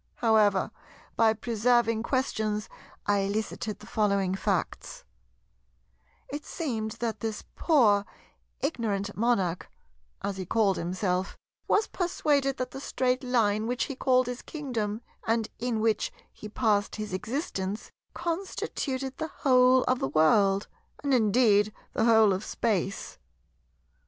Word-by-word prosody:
However, 215 -4 +3 0.4
by 225 -1 +4
preserving 230 0 +2
questions 220 -5 -1 0.4
I 205 0 +2
elicited 210 +1 -2
the 210 - -14
following 200 -4 +1
facts: 195 - -2 1.2
It 290 +2 -6
seemed 225 -10 -3
that 230 -2 -3
this 220 -2 -4
poor 215 - +4 0.6
ignorant 205 -8 -2
Monarch—as 180 - -3
he 190 - -4
called 205 -3 +2
himself—was 185 - -1
persuaded 290 -6 0
that 255 0 -3
the 270 - -7
Straight 255 -1 0
Line 220 -4 +1
which 245 +1 0
he 275 - -4
called 255 0 +3
his 245 0 -5
Kingdom, 230 -8 -3 0.2
and 225 -1 0
in 240 -2 -1
which 220 -1 +1 0.2
he 215 - -9
passed 210 -2 +1
his 215 -2 -5
existence, 210 - -3 0.2
constituted 280 -6 -3
the 315 - -3
whole 255 -1 +5
of 255 0 +1
the 135 - -1
world, 195 +7 +3 0.4
and 280 -1 +1
indeed 215 -3 +4 0.2
the 225 - +1
whole 220 -3 +6
of 190 +2 -3
Space. 200 -4 -2
220 Hz, 120 wpm, -28 LUFS, 205-255 Hz, 1.2 s, whole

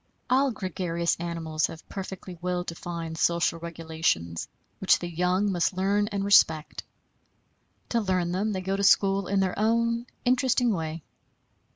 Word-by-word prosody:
All 270 +2 +4
gregarious 180 -5 -1
animals 165 -2 -2
have 160 - -11
perfectly 190 -1 -7
well 180 0 -1
defined 165 -1 -6
social 170 -1 +2
regulations, 160 - -2 0.3
which 190 - +4
the 175 - -5
young 180 +4 +1
must 180 +1 +1
learn 200 +2 +2
and 200 -2 -2
respect. 160 -6 +4 1.1
To 235 - +1
learn 185 -4 0
them, 200 +4 0
they 190 -2 -2
go 190 +1 -1
to 200 - -2
school 195 -1 +4
in 195 0 +1
their 185 -1 0
own 230 +2 +1 0.2
interesting 250 -1 +3
way. 160 -4 -3
185 Hz, 145 wpm, -27 LUFS, 170-200 Hz, 1.1 s, All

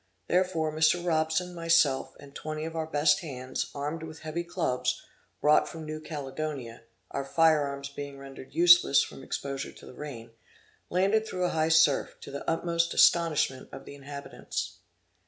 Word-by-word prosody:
Therefore 175 -4 +1
Mr. 160 +3 +3
Robson, 160 +2 0
myself, 165 -5 +2
and 140 -1 -13
20 155 +1 -5
of 165 0 -6
our 160 -1 -2
best 145 -1 +3
hands, 130 -5 -4
armed 145 +3 -3
with 160 0 -9
heavy 155 +2 -3
clubs, 170 -7 -1 0.4
brought 150 +1 +4
from 160 -1 -8
New 155 0 -5
Caledonia, 145 -5 -5 0.3
(our 140 - -2
fire 160 +2 +4
arms 140 0 -5
being 140 0 -7
rendered 135 -1 -11
useless 175 -4 +7
from - - -9
exposure 135 0 -4
to - - -15
the - - -11
rain) 125 -6 -8 0.6
landed 200 +5 +2
through 185 -3 -3
a - - +1
high 160 -1 +1
surf, 160 -4 +3
to - - -9
the 140 - -4
utmost 170 +1 0
astonishment 155 -6 +3
of - - -9
the - - -10
inhabitants. 140 0 -6
155 Hz, 160 wpm, -28 LUFS, 140-165 Hz, 0.6 s, useless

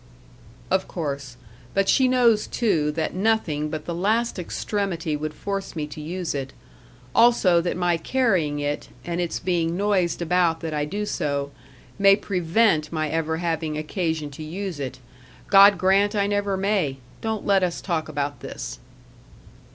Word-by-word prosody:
"Of 190 0 +2
course. 140 -6 -5 0.4
But 195 0 +2
she 260 - +4
knows 240 -4 +3
too 160 -11 +1
that 160 0 -2
nothing 185 -7 0
but 155 0 -5
the 170 - -3
last 215 +5 0
extremity 175 -3 -2
would 155 +1 -4
force 195 -2 -4
me 155 -2 -2
to 150 +1 -9
use 175 +2 -3
it: 135 -2 -4 0.6
also 220 -7 +5
that 175 +1 -2
my 175 -1 +2
carrying 180 - +1
it, 145 0 -3 0.2
and 175 0 -2
its 175 - -2
being 170 -1 0
noised 195 -4 +1
about 170 -1 +1
that 160 -1 -4
I 150 -1 0
do 205 +7 -3
so, 140 -6 -2 0.5
may 195 0 +7
prevent 180 -4 +1
my 155 -2 -1
ever 160 0 -1
having 160 -2 -2
occasion 155 -1 -2
to 155 +3 -8
use 180 +1 -5
it. 130 -2 -4 0.5
God 200 0 +8
grant 195 +3 +3
I 200 -1 +2
never 205 -1 0
may! 190 -9 0 0.2
Don't 220 -1 -3
let 195 -1 +4
us 180 -2 -1
talk 160 -4 -2
about 145 -1 -3
this." - - -7
175 Hz, 160 wpm, -24 LUFS, 155-200 Hz, 0.6 s, God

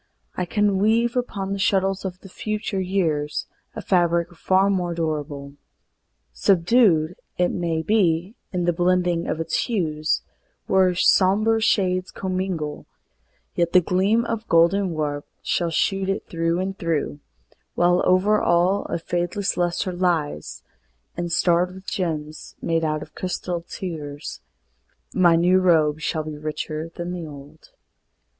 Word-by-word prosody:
I 180 - -1
can 205 +1 +1
weave 230 +4 +2
Upon 200 -6 -2
the 200 - -4
shuttles 195 0 +1
of 185 0 -5
the - - -11
future 210 +1 -3
years 160 -6 -1 0.3
A - - -6
fabric 170 -1 +2
far 190 +3 +2
more 180 -3 0
durable. 145 -3 -3 0.8
Subdued, 180 -3 +3 0.2
It 180 0 +2
may 165 -2 -1
be, 185 -2 +1 0.2
in 180 -2 -1
the 175 - +2
blending 175 0 +1
of - - -2
its 165 - -1
hues, 155 -9 -1 0.4
Where 185 -1 +3
somber 205 +5 +4
shades 185 -4 +1
commingle, 185 -5 -3 0.7
yet 170 -1 0
the 185 - +8
gleam 195 +6 +1
Of 230 -1 -3
golden 175 +4 +4
warp 145 -2 -3 0.2
shall 170 -1 0
shoot 195 +4 0
it 195 - -2
through 165 +1 -1
and 190 +1 -2
through, 160 -4 -2 0.6
While 175 +1 +3
over 200 +4 +3
all 175 +3 +2
a - - -2
fadeless 175 +4 -2
luster 175 +1 -1
lies, 170 - -1 0.5
And 175 0 -3
starred 180 +2 +2
with 190 0 -12
gems 155 -5 -4
made 165 -1 0
out 155 -1 -1
of 155 - -15
crystalled 180 -2 -4
tears, 150 -6 -6 0.7
My 175 -3 +5
new 180 +3 +4
robe 160 -4 +3
shall 155 0 -2
be 150 -1 -7
richer 155 +1 -4
than 175 +1 -6
the 175 -3 -5
old. 145 +1 -13
175 Hz, 140 wpm, -23 LUFS, 165-190 Hz, 0.8 s, the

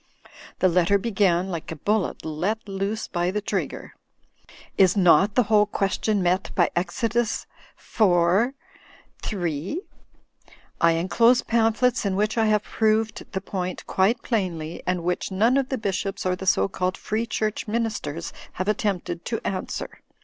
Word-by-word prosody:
The 185 - +3
letter 180 +2 +3
began 190 -4 +1
like 165 -3 -5
a - - -4
bullet 205 +5 -1
let 190 +9 -2
loose 195 +2 -3
by 175 0 -1
the 205 +3 -1
trigger. 205 - -4 0.8
"Is 190 +1 +4
not 190 +2 +5
the 250 - +5
whole 210 -1 +3
question 200 0 0
met 180 +2 +1
by 175 -3 +3
Ex. 175 +7 -2
iv. 230 0 0 0.3
3? 195 +4 +2 2.3
I 170 - +6
enclose 230 +9 +3
pamphlets 230 +2 +2
in 195 -2 0
which 210 +2 0
I 225 -2 +2
have 210 -1 +2
proved 220 0 0
the 190 - -2
point 185 -2 -4
quite 210 +6 +1
plainly, 175 -8 -2
and 180 -2 0
which 180 +3 -2
none 220 +7 +3
of 275 -2 +1
the 265 - -1
Bishops 195 -3 -3
or 185 0 +1
the 190 +1 -8
so - - +3
called 185 -1 -2
Free 220 +2 -2
Church 215 0 -2
Min 230 +2 0
isters 170 -7 -5 0.2
have 185 - -3
attempted 195 -5 -1
to 225 - -2
answer. 190 - -4
195 Hz, 150 wpm, -24 LUFS, 180-220 Hz, 2.3 s, I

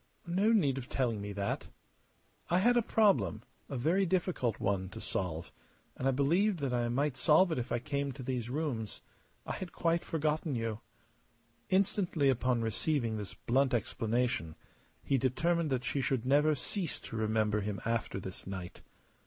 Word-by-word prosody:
"No 190 +6 +2
need 140 - +3
of 125 - -9
telling 115 -6 0
me 100 0 -5
that." 100 0 -2 0.8
"I 175 - +3
had 240 +6 +4
a 240 - +5
problem 195 - +2 0.3
a 140 - -3
very 165 +10 +2
difficult 165 - 0
one 95 -2 0
to - - -8
solve; 85 -3 -3 0.4
and 130 - -1
I - - +4
believed 170 +10 +2
that 140 -5 -2
I 120 -1 +1
might 135 +3 0
solve 155 +7 +4
it 160 - 0
if 120 - -5
I - - +2
came 140 +2 -2
to 130 - -8
these 125 -2 -2
rooms. 125 -7 -3 0.4
I - - -4
had 185 - -5
quite 165 0 +1
forgotten 155 -2 -1
you." 115 -2 -2 0.9
Instantly, 185 -6 +2
upon 125 -2 +1
receiving 115 0 0
this 105 -2 -6
blunt 130 +1 +2
explanation, 115 -6 -1 0.5
he 135 - +2
determined 160 +6 +1
that 130 -2 0
she 135 +3 0
should 125 -1 0
never 150 +3 +4
cease 180 +5 -3
to - - -8
remember 110 -1 +1
him 100 0 -3
after 115 -3 -1
this 95 -1 -7
night. 95 -2 -6
130 Hz, 170 wpm, -32 LUFS, 115-160 Hz, 0.9 s, a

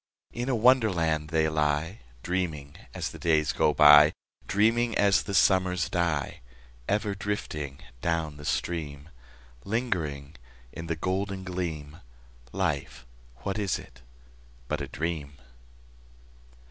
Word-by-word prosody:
In 120 +2 -3
a 130 - +2
Wonderland 95 -11 +3
they 80 0 +2
lie, 80 +5 0 0.2
Dreaming 80 -6 -3 0.2
as - - -4
the - - -11
days 75 -4 +2
go - - +3
by, 75 0 +8 0.3
Dreaming 115 +3 +2
as 100 -3 +4
the 100 - -4
summers 90 0 +3
die: 80 -6 -1 0.5
Ever 105 0 0
drifting 75 -9 -4 0.2
down 80 -3 -1
the 75 - -11
stream— 75 -3 -3 0.5
Lingering 80 - -3 0.4
in 80 - -7
the 85 - -1
golden 95 +3 -2
gleam— 80 -5 -5 0.5
Life, 80 -9 -2 0.4
what 100 +1 -2
is 100 -3 0
it - - -14 0.7
but 75 +1 -2
a 70 - -4
dream? 75 -2 -4
85 Hz, 120 wpm, -27 LUFS, 75-100 Hz, 0.7 s, by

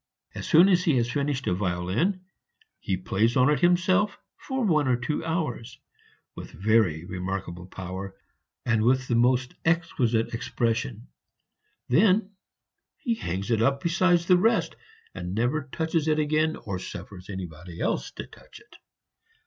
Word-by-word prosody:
As - - -6
soon 170 +4 +7
as 180 -2 +3
he 160 -6 +3
has 120 0 0
finished 140 -2 -1
a - - +1
violin 95 - -1 0.5
he 95 - -2
plays 110 +6 0
on 130 +3 +5
it 150 - +1
himself 185 +4 +2 0.2
for 265 -3 -3
one 155 -7 +2
or 125 -2 +3
two 150 +6 -3
hours, 145 -8 -3 0.6
with - - -9
very 100 -6 +1
remarkable 90 -1 -5
power 95 +1 -7 0.5
and 115 -3 +2
with 130 +3 +2
the - - 0
most 125 +2 +2
exquisite 130 -10 +1
expression, 115 - -2 0.8
then 195 - +3 0.7
he 245 -6 -1
hangs 95 - -4
it 110 -1 +2
up 135 +3 +1
beside 175 +1 +3
the 180 +1 +4
rest, 225 +6 +2 0.4
and 90 +2 -5
never 135 +6 -1
touches 160 -1 -1
it 155 -1 +2
again 155 +1 +1
or 95 -3 -5
suffers 95 0 -9
anybody 85 -3 -8
else - - -1
to - - -7
touch - - -16
it. - - -19
125 Hz, 150 wpm, -26 LUFS, 95-165 Hz, 0.8 s, soon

